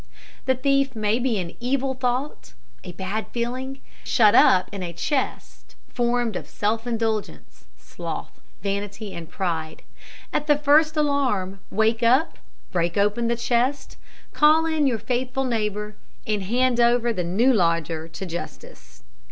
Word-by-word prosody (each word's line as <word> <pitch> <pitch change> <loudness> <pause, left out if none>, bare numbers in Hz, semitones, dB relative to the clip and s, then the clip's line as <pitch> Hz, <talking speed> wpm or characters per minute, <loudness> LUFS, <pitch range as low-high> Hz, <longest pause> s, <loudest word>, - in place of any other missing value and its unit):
The 260 - +3
thief 275 0 +1
may 215 +1 +1
be 245 -3 0
an 175 -2 -5
evil 265 +2 0
thought, 255 - -3 0.3
a - - -7
bad 190 +5 -4
feeling, 255 +3 -4 0.2
shut 215 -4 +4
up 185 - +6
in 200 -2 -6
a 175 -2 -5
chest 265 - -3
formed 240 -3 0
of - - -5
self 225 +3 -2
indulgence, 225 -3 -3
sloth, - - -7 0.2
vanity, 200 +1 -4
pride. 165 -4 -3 0.5
At 295 - -1
the 295 -1 +4
first 305 +2 +4
alarm, 255 -11 0
wake 220 +2 +1
up, 255 +7 +3 0.3
break 170 0 0
open 210 +4 +2
the 235 - +1
chest, 245 +4 0 0.4
call 310 +2 +5
in 315 -3 +1
your 245 -4 +1
faithful 255 +3 -2
neighbour, 210 -3 -2 0.3
and 210 -2 -1
hand 245 +3 +1
over 240 0 +3
the 180 - -2
new 215 +10 +3
lodger 165 -4 0
to 165 +4 -7
justice. 65 - -9
235 Hz, 140 wpm, -24 LUFS, 200-260 Hz, 0.5 s, up